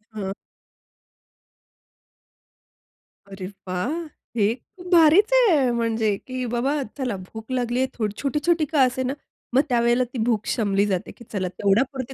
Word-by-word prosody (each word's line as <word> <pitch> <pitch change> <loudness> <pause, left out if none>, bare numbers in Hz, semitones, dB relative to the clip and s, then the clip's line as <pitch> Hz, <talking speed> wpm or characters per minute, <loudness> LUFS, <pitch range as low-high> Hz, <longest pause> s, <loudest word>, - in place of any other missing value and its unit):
हं. 195 -2 -3 3.0
अरे 195 -1 -7 0.2
वाह! 185 +9 -1 0.5
हे 210 +1 +3
खूप 360 +8 -15
भारीच 345 +7 +6
आहे. 340 - +5
म्हणजे, 225 -3 +1
की 255 -1 -3
बाबा 275 +5 0 0.2
चला 250 -6 -2
भूक 220 +6 -10
लागलीये, 250 +1 0
थो 215 -3 -1
छोटी-छोटी 305 +3 +1
का 295 -1 +1
असे 260 +1 +1
ना, 260 +2 -1 0.4
मग 270 - +7
त्यावेळेला 240 +1 +3
ती - - -4
भूक 220 -4 0
शमली 200 -3 +1
जाते, 190 -3 -2
की 235 - -15
चला 190 -3 -1
तेवढ्यापुरती 250 +8 0
245 Hz, 135 wpm, -24 LUFS, 210-275 Hz, 3.0 s, मग